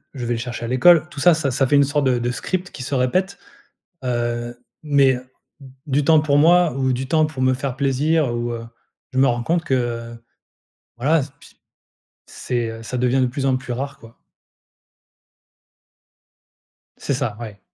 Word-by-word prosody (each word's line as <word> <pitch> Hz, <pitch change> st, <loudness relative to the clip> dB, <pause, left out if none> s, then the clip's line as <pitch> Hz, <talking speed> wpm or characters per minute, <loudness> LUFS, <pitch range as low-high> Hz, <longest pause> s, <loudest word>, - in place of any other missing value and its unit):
je 125 Hz, -, -5 dB
vais 120 Hz, -, -1 dB
le 115 Hz, -, -3 dB
chercher 120 Hz, -1 st, -5 dB
à -, -, -4 dB
l'école. 155 Hz, +6 st, +5 dB
Tout 150 Hz, -, -9 dB
ça, 175 Hz, +3 st, +5 dB
ça 145 Hz, -4 st, -1 dB
ça 135 Hz, +2 st, +1 dB
fait 145 Hz, -, +2 dB
une 140 Hz, -, +6 dB
sorte 145 Hz, 0 st, 0 dB
de 125 Hz, -2 st, +2 dB
de 120 Hz, +1 st, -1 dB
script 185 Hz, +7 st, -4 dB
qui 130 Hz, -, -9 dB
se 140 Hz, -, -5 dB
répète, 185 Hz, +10 st, 0 dB, 0.7 s
heu, 120 Hz, -1 st, -2 dB, 0.3 s
mais, 140 Hz, -3 st, +3 dB
heu, -, -, -6 dB, 0.4 s
d 135 Hz, -, -12 dB, 0.2 s
du 140 Hz, +1 st, +1 dB
temps 160 Hz, -1 st, +6 dB
pour 145 Hz, -2 st, +2 dB
moi 170 Hz, 0 st, +5 dB
ou 130 Hz, -1 st, +1 dB
du 130 Hz, +2 st, -3 dB
temps 155 Hz, +2 st, +3 dB
pour 150 Hz, -4 st, -6 dB
me 130 Hz, 0 st, +3 dB
faire 130 Hz, 0 st, -4 dB
plaisir 140 Hz, 0 st, +1 dB
ou, 120 Hz, 0 st, -2 dB
heu, 115 Hz, 0 st, -6 dB, 0.5 s
je 130 Hz, -, 0 dB
me 135 Hz, -, +5 dB
rends 120 Hz, -1 st, 0 dB
compte 170 Hz, +4 st, 0 dB
que, 145 Hz, -5 st, -2 dB
heu, 115 Hz, -1 st, -3 dB, 0.8 s
voilà, 150 Hz, +7 st, +2 dB
s 135 Hz, -1 st, -5 dB
pi -, -, -18 dB, 0.7 s
c'est, 120 Hz, -2 st, -3 dB
heu, 115 Hz, 0 st, -9 dB
ça 125 Hz, -, -4 dB
devient 125 Hz, +1 st, +1 dB
de -, -, +3 dB
plus 135 Hz, +2 st, -4 dB
en 130 Hz, -1 st, +2 dB
plus 130 Hz, -1 st, -6 dB
rare, 140 Hz, +3 st, -5 dB
quoi. 115 Hz, 0 st, -16 dB, 2.8 s
C'est -, -, -2 dB
ça. 125 Hz, -5 st, -2 dB
Ouais. 105 Hz, -3 st, -9 dB
130 Hz, 195 wpm, -21 LUFS, 120-145 Hz, 2.8 s, une